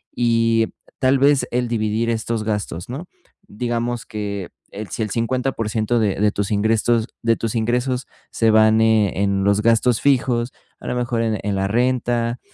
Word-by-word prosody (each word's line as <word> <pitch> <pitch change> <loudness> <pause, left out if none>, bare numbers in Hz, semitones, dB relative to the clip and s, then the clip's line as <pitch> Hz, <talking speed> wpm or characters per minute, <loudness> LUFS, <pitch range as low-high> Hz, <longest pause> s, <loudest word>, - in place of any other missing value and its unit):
y 115 -1 +2 0.3
tal 130 0 +3
vez, 140 0 +3
el 125 0 0
dividir 110 0 -1
estos 115 -1 -2
gastos, 105 -5 -3
¿no?, 140 +8 -6 0.4
digamos, 120 +1 -3
que 100 -3 -5 0.2
el 105 +1 -7
si 110 - -3
el 110 - -4
50% 115 -1 -1
de 105 -4 +1
de 105 0 +3
tus 100 -1 -2
ingrestos 110 +2 +1
de 115 -1 +2
tus 115 -1 -3
ingresos 125 +3 -1 0.2
se 115 - +2
van 110 0 +5
e 110 -4 +2
en 100 -1 +1
los 100 +1 +2
gastos 115 +1 +2
fijos, 125 -3 +1
eh, - - -34 0.3
a - - -8
lo - - -2
mejor 120 -1 -1
en 110 -2 0
en 100 -1 -1
la 95 0 0
renta, 120 +1 0
115 Hz, 170 wpm, -21 LUFS, 105-120 Hz, 0.4 s, van